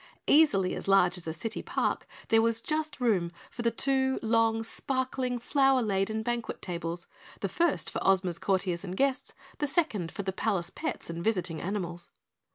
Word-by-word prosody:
Easily 210 -12 +4
as - - -5
large 190 -2 +5
as 180 -2 -5
a - - -1
city 215 +8 -4
park, - - -1 0.2
there 225 0 +5
was 230 0 +2
just 305 +4 -2
room 195 -9 +2 0.2
for 240 - -6
the 235 - +3
two 265 +2 +2
long, 225 0 +2
sparkling, 255 +1 -2
flower 270 +1 +3
laden 215 +1 0
banquet 240 0 -2
tables, 170 -1 -4 0.4
the 195 - 0
first 335 - +1
for - - -3
Ozma's 185 -3 +2
courtiers 185 -3 0
and 185 -1 -5
guests, 275 -1 0 0.2
the 295 - +1
second 270 - 0
for 200 - -5
the 190 0 -2
palace 190 -3 -1
pets 310 - -4
and 170 0 -5
visiting 180 -6 0
animals. 175 -3 -4
220 Hz, 170 wpm, -29 LUFS, 180-255 Hz, 0.4 s, large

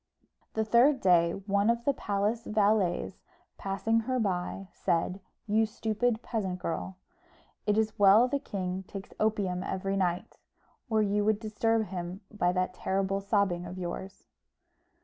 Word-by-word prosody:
The 220 0 +1
third 250 +5 +5
day, 170 -4 +4
one 200 +1 +2
of 235 0 0
the 280 - +3
palace 210 +1 -1
valets, 210 -4 +1 0.4
passing 210 +4 0
her 255 +3 -1
by, 195 -2 -2
said, 175 +3 0 0.3
"You 220 +1 +2
stupid 225 +1 -1
peasant 195 -6 -2
girl, 180 +2 -4 0.7
it 210 0 +3
is 220 -1 0
well 205 +5 +7
the 280 +2 -1
king 190 -7 -4
takes 195 -1 -8
opium 200 -4 0
every 195 +1 -2
night, 180 -2 -1 0.5
or 220 -1 +3
you 205 0 +1
would 215 -1 +2
disturb 220 0 0
him 180 +1 -5
by 180 -5 +1
that 185 0 -1
terrible 195 +1 -1
sobbing 195 -4 0
of 180 +2 -7
yours." 185 +2 -6
200 Hz, 145 wpm, -29 LUFS, 185-220 Hz, 0.7 s, well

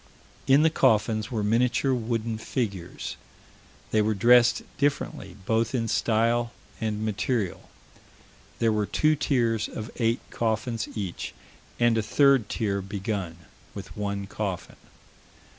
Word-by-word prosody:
In 140 +3 +6
the 160 - +4
coffins 110 -4 +2
were 110 -5 -2
miniature 125 +5 +2
wooden 115 -2 -2
figures. 100 -7 -4 0.7
They 110 - +3
were 110 0 +1
dressed 120 +3 +5 0.2
differently 140 -6 -1
both 115 +3 +1
in 115 -2 0
style 115 +2 +1 0.3
and 110 -1 -2
material. 110 -2 -2 0.9
There 115 -1 +2
were 105 -1 0
two 155 0 +2
tiers 115 -6 +1
of 110 +1 -6
eight 115 0 +1
coffins 115 0 -1
each, 100 -5 -4 0.4
and 120 -1 +4
a - - +2
third 135 0 +3
tier 100 -4 -1
begun, 95 -4 -4 0.3
with 100 -2 -8
one 100 -1 -3
coffin. 95 -2 -4
110 Hz, 125 wpm, -26 LUFS, 105-120 Hz, 0.9 s, In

